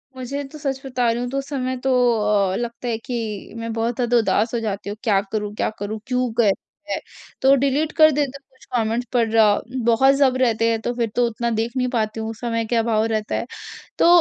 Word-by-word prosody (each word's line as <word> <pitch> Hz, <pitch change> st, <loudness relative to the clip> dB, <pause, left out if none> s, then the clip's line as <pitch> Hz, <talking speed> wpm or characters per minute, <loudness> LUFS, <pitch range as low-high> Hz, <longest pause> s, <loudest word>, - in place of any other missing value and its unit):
मुझे 260 Hz, +3 st, -4 dB
तो 310 Hz, -, -9 dB
सच 275 Hz, -2 st, -3 dB
बता 250 Hz, -2 st, 0 dB
रही 235 Hz, +1 st, -2 dB
हूँ 245 Hz, -, -3 dB
तो 275 Hz, -, -3 dB
उस 275 Hz, 0 st, -3 dB
समय 260 Hz, -2 st, -2 dB
तो 265 Hz, -, +2 dB, 0.6 s
अ, -, -, -1 dB
लगता 235 Hz, +2 st, -4 dB
है 230 Hz, -2 st, 0 dB
कि 225 Hz, -4 st, -5 dB
मैं 230 Hz, 0 st, -4 dB
बहुत 230 Hz, +1 st, -1 dB
ज़्यादा 245 Hz, -1 st, +2 dB
उदास 225 Hz, 0 st, +1 dB
हो 235 Hz, -, +1 dB
जाती 205 Hz, -2 st, -3 dB
हूँ, 205 Hz, -, -5 dB
क्या 210 Hz, -5 st, +3 dB
करूँ 210 Hz, -1 st, -2 dB
क्या -, -, 0 dB
करूँ? 210 Hz, +2 st, -4 dB
क्यों 250 Hz, -1 st, 0 dB
कहते 235 Hz, +8 st, -2 dB
हैं? -, -, -1 dB, 0.4 s
तो 270 Hz, +1 st, +6 dB
डिलीट 280 Hz, +3 st, +1 dB
कर 310 Hz, -1 st, +8 dB
देती 280 Hz, -2 st, -1 dB
हूँ 275 Hz, -, -59 dB
कुछ 260 Hz, -, -20 dB
कमेंट्स 230 Hz, +1 st, 0 dB
पर 235 Hz, -2 st, +2 dB
ज 225 Hz, +3 st, +3 dB
बहुत 265 Hz, +4 st, +5 dB
जब 275 Hz, -2 st, +3 dB
रहते 230 Hz, -3 st, +2 dB
हैं 225 Hz, -1 st, +1 dB
तो 240 Hz, -, -2 dB
फिर 235 Hz, -2 st, 0 dB
तो 245 Hz, -, +3 dB
उतना 235 Hz, +1 st, -2 dB
देख 225 Hz, +1 st, -1 dB
नहीं 250 Hz, 0 st, +1 dB
पाती 220 Hz, -1 st, -1 dB
हूँ। 220 Hz, 0 st, -3 dB
उस 225 Hz, 0 st, -8 dB
समय 230 Hz, -2 st, -1 dB
क्या 230 Hz, +1 st, +1 dB
भाव 220 Hz, -1 st, +2 dB
रहता 220 Hz, -1 st, -1 dB
है। -, -, -2 dB, 0.5 s
तो -, -, +5 dB
235 Hz, 235 wpm, -22 LUFS, 225-260 Hz, 0.6 s, कर